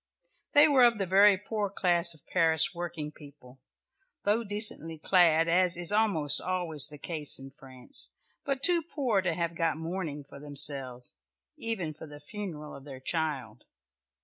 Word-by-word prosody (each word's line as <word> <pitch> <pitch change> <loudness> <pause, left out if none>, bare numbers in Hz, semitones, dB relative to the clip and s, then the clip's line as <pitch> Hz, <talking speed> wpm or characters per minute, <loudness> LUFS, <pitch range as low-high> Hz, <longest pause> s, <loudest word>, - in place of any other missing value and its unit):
They 290 +1 +7
were 275 -4 +4
of 235 -2 +4
the 195 - -2
very 195 +2 +5
poor 205 +1 -4
class 175 -3 +1
of 150 - -24
Paris 165 -2 +3
working 170 -3 -6
people, 140 -4 -16 0.6
though 210 +3 +1
decently 205 -6 +1
clad, 165 -1 +3
as 175 +1 +2
is 175 +1 -1
almost 200 -9 +3
always 175 -6 -1
the 150 -1 -11
case 150 -1 -1
in 135 0 -11
France, 135 - -2 0.3
but 275 -1 -3
too 345 +1 +6
poor 265 - -1
to 180 -3 -2
have 170 0 -2
got 165 -1 -1
mourning 160 -3 -5
for 140 - -14
themselves, 135 - -1 0.4
even 190 -9 -4
for 155 +1 -12
the 145 0 -12
funeral 150 -2 -8
of 140 - -12
their 135 -2 -10
child. 150 -3 -4
170 Hz, 160 wpm, -28 LUFS, 150-200 Hz, 0.6 s, They